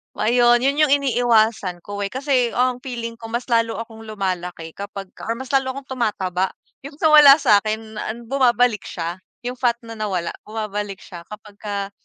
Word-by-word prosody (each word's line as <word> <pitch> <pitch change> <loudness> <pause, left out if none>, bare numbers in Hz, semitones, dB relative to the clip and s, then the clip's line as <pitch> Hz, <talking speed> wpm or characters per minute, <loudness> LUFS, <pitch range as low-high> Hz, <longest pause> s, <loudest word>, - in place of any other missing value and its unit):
Ayun, 240 +2 +3
yun 280 +2 +1
yung 275 - +4
iniiwasan 230 -9 +2
ko 205 0 -6
eh. 200 - -1
Kasi 260 -1 0
ang 250 0 +1
feeling 235 -3 -6
ko 225 - -8
mas 235 +2 -4
lalo 230 -1 +2
akong 225 -1 -11
lumalaki 180 -5 -4
kapag 200 0 -8
or 230 - -2
mas 260 +2 -8
lalo 265 -1 +1
akong 275 -1 -9
tumataba 190 -5 0 0.4
yung 285 0 -9
sa 315 +1 +2
wala 290 -2 +10
sa'kin 220 -4 +1
an 235 +2 -5
bumabalik 245 -4 +2
siya 170 +1 -4 0.3
yung 250 +1 -4
fat 240 -2 +2
na 225 -1 -9
nawala 185 -5 -2 0.2
bumabalik 210 -2 -4
siya. 170 -3 -11
Kapagka 205 -1 -6
225 Hz, 170 wpm, -21 LUFS, 200-250 Hz, 0.4 s, wala